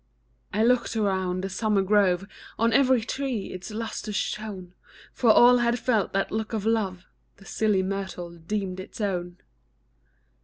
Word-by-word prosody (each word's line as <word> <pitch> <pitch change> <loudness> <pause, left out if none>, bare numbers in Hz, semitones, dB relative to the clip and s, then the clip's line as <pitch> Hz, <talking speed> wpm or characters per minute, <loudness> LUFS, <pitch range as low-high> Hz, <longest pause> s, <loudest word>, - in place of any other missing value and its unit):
I 215 +2 +1
looked 240 -1 +2
around 190 -3 0
the - - -1
summer 205 0 +1
grove, 195 -2 +3 0.3
On 230 0 +2
every 260 -1 +4
tree 245 -2 -3
its 185 +3 -7
lustre 220 0 -5
shone; 200 -3 -4 0.4
For 240 - +2
all 245 +2 +7
had 240 0 +2
felt 230 -5 0
that 195 0 0
look 220 +1 -3
of 215 -2 -2
love 195 -5 0 0.3
The 195 - -17
silly 210 -3 +1
myrtle 190 -3 -4
deemed 185 +2 -4
its 185 - -9
own. 180 -4 -2
205 Hz, 150 wpm, -26 LUFS, 185-225 Hz, 0.4 s, all